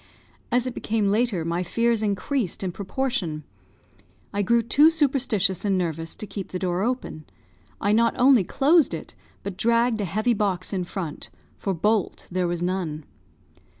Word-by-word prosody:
As 245 Hz, 0 st, +2 dB
it 255 Hz, -, -3 dB
became 215 Hz, -3 st, 0 dB
later, 210 Hz, -5 st, +1 dB
my 170 Hz, +1 st, -1 dB
fears 230 Hz, +5 st, +1 dB
increased 210 Hz, -, -1 dB
in 185 Hz, -, -1 dB
proportion. 190 Hz, -5 st, -2 dB, 0.9 s
I 205 Hz, -, 0 dB
grew 235 Hz, +4 st, +2 dB
too 290 Hz, +7 st, +5 dB
superstitious 260 Hz, -, +1 dB
and 200 Hz, -2 st, +1 dB
nervous 165 Hz, -2 st, -3 dB
to -, -, -6 dB
keep 195 Hz, -1 st, -6 dB
the 185 Hz, -, -4 dB
door 180 Hz, 0 st, -1 dB
open. 225 Hz, -, -3 dB, 0.5 s
I 205 Hz, -, +1 dB
not 230 Hz, +2 st, +3 dB
only 255 Hz, -4 st, +6 dB
closed 295 Hz, -, +3 dB
it, -, -, -9 dB, 0.3 s
but 195 Hz, -2 st, -5 dB
dragged 230 Hz, +1 st, +2 dB
a -, -, -1 dB
heavy 215 Hz, +7 st, +1 dB
box 200 Hz, -3 st, -1 dB
in 185 Hz, -2 st, -1 dB
front, 175 Hz, -4 st, -6 dB, 0.3 s
for 195 Hz, -2 st, -2 dB
bolt 210 Hz, +3 st, 0 dB
there 180 Hz, 0 st, 0 dB
was 175 Hz, 0 st, -2 dB
none. 175 Hz, -5 st, -2 dB
200 Hz, 160 wpm, -24 LUFS, 180-235 Hz, 0.9 s, only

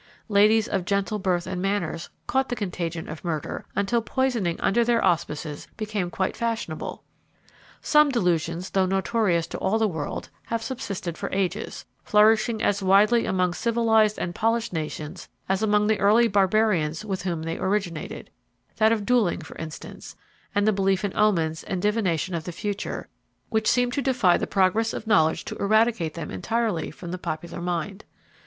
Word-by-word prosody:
Ladies 210 Hz, +1 st, +4 dB
of 190 Hz, -, -1 dB
gentle 200 Hz, +2 st, 0 dB
birth 180 Hz, -2 st, 0 dB
and 185 Hz, 0 st, -4 dB
manners 185 Hz, -4 st, -2 dB, 0.2 s
caught 265 Hz, 0 st, 0 dB
the 245 Hz, -, -1 dB
contagion 175 Hz, -6 st, -4 dB
of 155 Hz, +1 st, -8 dB
murder, 160 Hz, -4 st, -3 dB
until 215 Hz, +4 st, +1 dB
poisoning, 230 Hz, -8 st, 0 dB
under 235 Hz, +4 st, +2 dB
their 235 Hz, 0 st, +2 dB
auspices, 155 Hz, -3 st, -1 dB
became 210 Hz, -4 st, -2 dB
quite 190 Hz, +2 st, -2 dB
fashionable. 230 Hz, -9 st, -3 dB, 0.8 s
Some 300 Hz, -1 st, +5 dB
delusions, 175 Hz, -, 0 dB
though 190 Hz, -1 st, +2 dB
notorious 190 Hz, -2 st, +1 dB
to -, -, -6 dB
all 210 Hz, +4 st, +1 dB
the 220 Hz, -1 st, +2 dB
world, 160 Hz, -6 st, -5 dB, 0.2 s
have 230 Hz, 0 st, -2 dB
subsisted 200 Hz, -10 st, -5 dB
for -, -, -3 dB
ages, 195 Hz, +2 st, -2 dB, 0.2 s
flourishing 215 Hz, +1 st, +3 dB
as 205 Hz, 0 st, +1 dB
widely 205 Hz, +5 st, +4 dB
among 180 Hz, -2 st, +1 dB
civilised 220 Hz, -1 st, +2 dB
and 175 Hz, -, -3 dB
polished 230 Hz, +1 st, 0 dB
nations 155 Hz, +1 st, -5 dB, 0.2 s
as 190 Hz, +1 st, 0 dB
among 210 Hz, -1 st, +3 dB
the 215 Hz, 0 st, +2 dB
early 220 Hz, +4 st, +5 dB
barbarians 195 Hz, -4 st, +2 dB
with 195 Hz, -3 st, -3 dB
whom 170 Hz, -4 st, -3 dB
they 165 Hz, 0 st, -4 dB
originated, 190 Hz, -4 st, -3 dB, 0.5 s
that 220 Hz, 0 st, +4 dB
of 215 Hz, -3 st, 0 dB
duelling, 230 Hz, -8 st, +2 dB
for 155 Hz, -, -11 dB
instance, 160 Hz, -1 st, -8 dB, 0.4 s
and 205 Hz, +1 st, +2 dB
the 215 Hz, -, +4 dB
belief 195 Hz, 0 st, +1 dB
in 200 Hz, -, -4 dB
omens 165 Hz, -7 st, +1 dB
and 185 Hz, -, -2 dB
divination 190 Hz, -4 st, 0 dB
of 165 Hz, -2 st, -3 dB
the 175 Hz, -, -4 dB
future, 205 Hz, +3 st, -4 dB, 0.4 s
which 220 Hz, -2 st, +1 dB
seem 245 Hz, 0 st, +2 dB
to 280 Hz, -, -1 dB
defy 245 Hz, -9 st, +3 dB
the -, -, -1 dB
progress 205 Hz, +4 st, +2 dB
of -, -, -5 dB
knowledge 160 Hz, -8 st, +3 dB
to -, -, -5 dB
eradicate 215 Hz, -5 st, +2 dB
them 165 Hz, -3 st, -5 dB
entirely 215 Hz, -, -1 dB
from 170 Hz, +3 st, -9 dB
the 180 Hz, -, -4 dB
popular 170 Hz, +1 st, -5 dB
mind. 180 Hz, +3 st, -3 dB
195 Hz, 165 wpm, -25 LUFS, 175-220 Hz, 0.8 s, Some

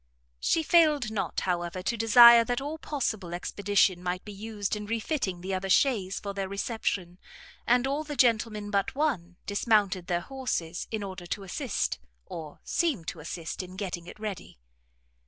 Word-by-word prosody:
She 320 Hz, -, +2 dB
failed 305 Hz, -8 st, +4 dB
not, 215 Hz, -, -2 dB
however, 175 Hz, 0 st, -2 dB
to 235 Hz, -, 0 dB
desire 235 Hz, +1 st, +8 dB
that 245 Hz, 0 st, -1 dB
all 295 Hz, +3 st, -5 dB
possible 220 Hz, -, -3 dB
expedition 195 Hz, 0 st, +1 dB
might 180 Hz, 0 st, -3 dB
be 210 Hz, -, -8 dB
used 210 Hz, 0 st, -3 dB
in 210 Hz, 0 st, -6 dB
refitting 225 Hz, -, -2 dB
the 190 Hz, +2 st, -4 dB
other 190 Hz, +1 st, -2 dB
chaise 195 Hz, -3 st, +2 dB
for 200 Hz, -1 st, -5 dB
their 195 Hz, -1 st, -3 dB
reception; 195 Hz, -3 st, -3 dB, 0.5 s
and 245 Hz, +1 st, +4 dB
all 280 Hz, +3 st, -1 dB
the 295 Hz, -1 st, -6 dB
gentlemen 220 Hz, -4 st, +2 dB
but 200 Hz, +3 st, 0 dB
one, 220 Hz, -, -1 dB
dismounted 205 Hz, -3 st, +1 dB
their 175 Hz, -1 st, 0 dB
horses, 190 Hz, -9 st, -3 dB
in 220 Hz, -2 st, -3 dB
order 190 Hz, -2 st, -7 dB
to 200 Hz, +3 st, -4 dB
assist, 195 Hz, -, -2 dB, 0.3 s
or 155 Hz, -3 st, -8 dB
seem 300 Hz, -, 0 dB
to 165 Hz, -, -5 dB
assist 165 Hz, +2 st, -5 dB
in 185 Hz, 0 st, -10 dB
getting 175 Hz, -3 st, -5 dB
it -, -, -11 dB
ready. 210 Hz, -, -6 dB
205 Hz, 165 wpm, -28 LUFS, 180-235 Hz, 0.5 s, desire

